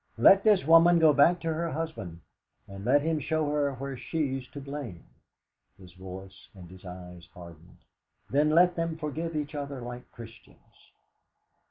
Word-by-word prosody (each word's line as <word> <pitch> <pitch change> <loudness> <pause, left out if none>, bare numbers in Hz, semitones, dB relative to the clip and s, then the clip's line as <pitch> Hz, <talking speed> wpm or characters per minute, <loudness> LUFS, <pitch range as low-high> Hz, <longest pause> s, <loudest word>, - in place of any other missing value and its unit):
Let 195 +12 +6
this 210 -8 +3
woman 165 +2 +6
go 160 -2 +5
back 155 +5 +4
to 165 -1 -2
her 165 +1 -2
husband, 145 - -6 0.5
and 100 0 -10
let 140 +5 +3
him 160 -1 0
show 155 +1 -1
her 145 -2 0
where 135 +1 -6
she's 135 -2 -3
to 145 - -10
blame" 140 - -7 0.7
his 90 -3 -16
voice 95 +1 -11
and 90 -2 -12
his 95 -1 -14
eyes 90 -1 -11
hardened 85 -1 -14 0.5
"then 145 +3 +2
let 175 +3 +4
them 165 -1 -3
forgive 160 +2 -4
each 150 0 -3
other 140 -2 -5
like 120 0 -9
Christians. 115 -1 -16
140 Hz, 160 wpm, -28 LUFS, 95-160 Hz, 0.7 s, Let